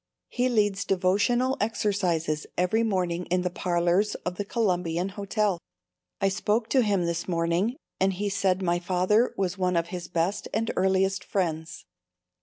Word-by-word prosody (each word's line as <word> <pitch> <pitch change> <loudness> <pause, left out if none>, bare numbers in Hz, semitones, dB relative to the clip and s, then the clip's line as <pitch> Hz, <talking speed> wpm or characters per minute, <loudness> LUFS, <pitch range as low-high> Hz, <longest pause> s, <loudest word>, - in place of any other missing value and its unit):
He 250 +1 0
leads 205 -5 +1
devotional 205 +9 +2
exercises 185 -8 0
every 180 +5 +2
morning 180 -5 -1
in 180 +1 +1
the 180 - -1
parlors 175 +3 +1
of 180 - -1
the 205 - -1
Columbian 180 -5 0
Hotel. 200 -1 -1 0.6
I 195 - +2
spoke 215 +4 0
to 265 - +4
him 200 -6 +1
this 170 0 -2
morning 170 +6 0 0.2
and 190 0 +2
he 205 +3 -2
said 195 -2 +1
my 175 -1 +1
father 185 +6 +2
was 190 0 -1
one 180 -1 +1
of 170 0 0
his 175 -1 -5
best 175 +3 -1
and 225 +1 0
earliest 190 0 +2
friends. 165 -4 -3
190 Hz, 155 wpm, -27 LUFS, 175-205 Hz, 0.6 s, to